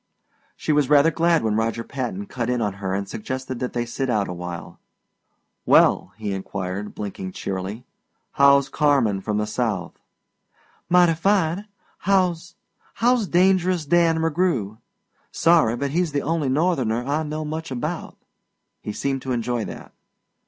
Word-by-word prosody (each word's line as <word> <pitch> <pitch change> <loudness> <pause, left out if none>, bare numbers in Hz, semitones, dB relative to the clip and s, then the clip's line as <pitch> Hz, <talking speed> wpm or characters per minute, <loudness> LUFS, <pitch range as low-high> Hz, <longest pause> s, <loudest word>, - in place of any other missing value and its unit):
She - - -2
was 145 -3 +2
rather 150 +2 +5
glad 165 -2 +2
when 110 -1 +1
Roger 115 +1 -1
Patton 140 +12 -4
cut 125 -9 -4
in 125 -1 +1
on 105 -4 -1
her 95 -1 -1
and 100 0 -3
suggested 130 +4 -5
that 125 - -3
they 120 -1 -1
sit 130 +2 -3
out 105 -4 +1
a 90 - -4
while. 85 -1 -7 0.8
"Well," - - +4
he 105 -2 -3
inquired, 95 +1 -5
blinking 95 -2 -6
cheerily, 95 +5 -5 0.5
"how's 140 0 +5
Carmen 135 -10 +2
from 105 +1 -2
the 105 - 0
South?" 105 -5 -3 0.9
"Mighty 175 -1 +5
fine. 190 +2 +1 0.3
How's 180 -3 +1 0.4
how's 240 -2 +2
Dangerous 180 -2 +2
Dan 165 +1 +3
McGrew? 160 - 0 0.5
Sorry, 165 -9 +3
but 140 +2 -2
he's 170 -1 0
the 140 - 0
only 160 -3 0
Northerner 130 -6 +1
I 145 +3 0
know 155 0 -4
much 160 +2 -5
about." 125 -2 -4 0.6
He 105 - -5
seemed 135 +3 -2
to 130 - -4
enjoy 120 -1 -1
that. - - -9
135 Hz, 150 wpm, -23 LUFS, 110-165 Hz, 0.9 s, rather